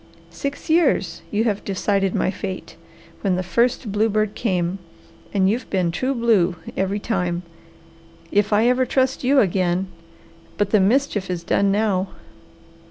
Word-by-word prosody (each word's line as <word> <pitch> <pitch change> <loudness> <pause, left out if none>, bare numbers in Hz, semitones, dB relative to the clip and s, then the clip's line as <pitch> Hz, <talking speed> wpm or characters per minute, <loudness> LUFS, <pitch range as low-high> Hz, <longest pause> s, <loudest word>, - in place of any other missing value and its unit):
Six 280 0 -5
years 330 +2 +2
you 215 +1 +1
have 210 -3 -1
decided 195 0 0
my - - +1
fate, 190 -1 -6 0.5
when 190 -3 +1
the 185 - -1
first 235 +3 0
bluebird 215 0 +1
came, 185 -4 -1 0.5
and 190 -2 +2
you've 230 +6 -1
been 180 -3 +1
true 260 +10 -1
blue 215 -7 +2 0.2
every 195 +1 0
time. 180 -5 -2 0.9
If 205 +1 +2
I 215 +3 +4
ever 250 +1 +2
trust 260 +1 +1
you 270 +2 +4
again! 185 -1 0 0.7
But 205 -1 0
the 215 - +5
mischief 210 -1 +1
is 175 -2 -3
done 200 +3 +2
now. 200 -2 +1
205 Hz, 145 wpm, -22 LUFS, 185-230 Hz, 0.9 s, the